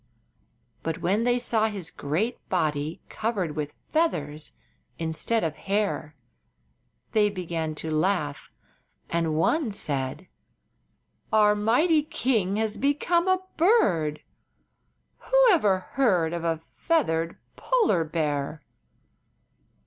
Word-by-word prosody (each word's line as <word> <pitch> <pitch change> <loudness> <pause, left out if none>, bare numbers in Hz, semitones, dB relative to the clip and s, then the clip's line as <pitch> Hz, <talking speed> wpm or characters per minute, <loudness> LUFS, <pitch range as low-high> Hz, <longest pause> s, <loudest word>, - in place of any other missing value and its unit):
But 165 0 -4
when 205 +6 +1
they 245 0 +3
saw 230 -2 +2
his 195 -5 -4
great 175 - -2
body 155 -3 -1
covered 200 -9 -2
with 150 -1 -4
feathers 155 - -1 0.5
instead 165 +8 -1
of 160 -2 -1
hair 200 -6 -2 1.0
they 210 -1 +3
began 170 -5 -3
to 160 +1 -3
laugh, 155 -3 0 0.6
and 165 -2 0
one 235 - +1
said: 140 -2 -3 1.0
"Our 210 -1 +5
mighty 250 +10 +3
king 225 -9 0
has 220 0 -1
become 320 +6 +1
a 375 0 +2
bird! 180 - +3 1.0
Who - - 0
ever 210 - +4
before 185 - -14
heard 185 -12 +2
of 170 -1 -3
a 165 -1 -1
feathered 165 - 0 0.2
polar 435 - +2
bear?" 150 -2 -2
185 Hz, 110 wpm, -26 LUFS, 160-235 Hz, 1.0 s, Our